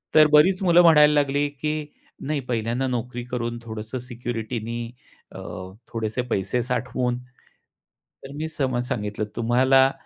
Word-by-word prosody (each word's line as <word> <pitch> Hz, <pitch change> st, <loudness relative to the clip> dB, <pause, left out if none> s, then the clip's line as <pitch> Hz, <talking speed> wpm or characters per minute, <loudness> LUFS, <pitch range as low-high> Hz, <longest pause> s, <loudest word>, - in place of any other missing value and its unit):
तर 155 Hz, -1 st, +8 dB
बरीच 180 Hz, +6 st, +5 dB
मुलं 175 Hz, -1 st, +6 dB
म्हणायला 150 Hz, -3 st, +7 dB
लागली, 145 Hz, 0 st, +2 dB
की 150 Hz, +2 st, -3 dB, 0.4 s
नाही 150 Hz, -1 st, 0 dB
पहिल्यांदा 120 Hz, +2 st, -1 dB
नोकरी 125 Hz, 0 st, -3 dB
करून 120 Hz, -1 st, -2 dB
थोडंसं 110 Hz, +1 st, -6 dB
सिक्युरिटी 120 Hz, -1 st, -4 dB
नी 115 Hz, +2 st, -5 dB, 0.5 s
अ, -, -, -9 dB, 0.5 s
थोडेसे 110 Hz, +1 st, -2 dB
पैसे 100 Hz, +6 st, 0 dB
साठवून 125 Hz, 0 st, -1 dB, 1.1 s
तर 135 Hz, -, -9 dB
मी 155 Hz, +2 st, -3 dB
सम 130 Hz, -5 st, -1 dB
सांगितलं 105 Hz, -3 st, -2 dB
तुम्हाला 130 Hz, +3 st, +4 dB
125 Hz, 130 wpm, -24 LUFS, 115-145 Hz, 1.1 s, तर